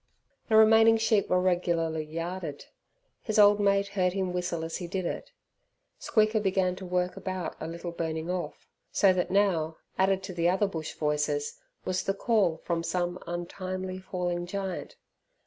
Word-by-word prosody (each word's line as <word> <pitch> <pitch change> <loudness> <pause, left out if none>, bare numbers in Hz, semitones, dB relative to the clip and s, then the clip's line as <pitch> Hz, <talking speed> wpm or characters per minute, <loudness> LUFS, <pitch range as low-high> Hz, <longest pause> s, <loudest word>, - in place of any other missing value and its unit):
The 220 - +3
remaining 225 +1 +7
sheep 220 -2 +2
were 180 - +3
regularly 170 -3 0
yarded. 165 -1 -5 0.6
His 215 -2 -2
old 205 0 +7
mate 200 0 +2
heard 185 -3 +1
him 190 -2 -1
whistle 175 -2 -2
as 165 - -4
he 175 - -6
did 185 +1 -3
it. - - -4 0.7
Squeaker 215 -1 +2
began 190 -2 +1
to 185 - -7
work 180 0 0
about 185 -2 -4
a 160 - -5
little 170 +1 -5
burning 160 -1 -3
off. 180 0 -4 0.3
So 195 -3 +4
that 180 -1 -1
now, 175 -5 +1 0.2
added 190 0 +2
to 190 -1 -6
the 170 0 +2
other 190 +3 +2
bush 165 -6 -5
voices, 160 - -1 0.3
was 185 -1 0
the 195 - -1
call 200 -7 +2
from 170 -1 -1
some 175 +1 -2
untimely 185 +2 -4
falling 175 -2 -3
giant. 190 -1 -4
185 Hz, 165 wpm, -28 LUFS, 170-200 Hz, 0.7 s, remaining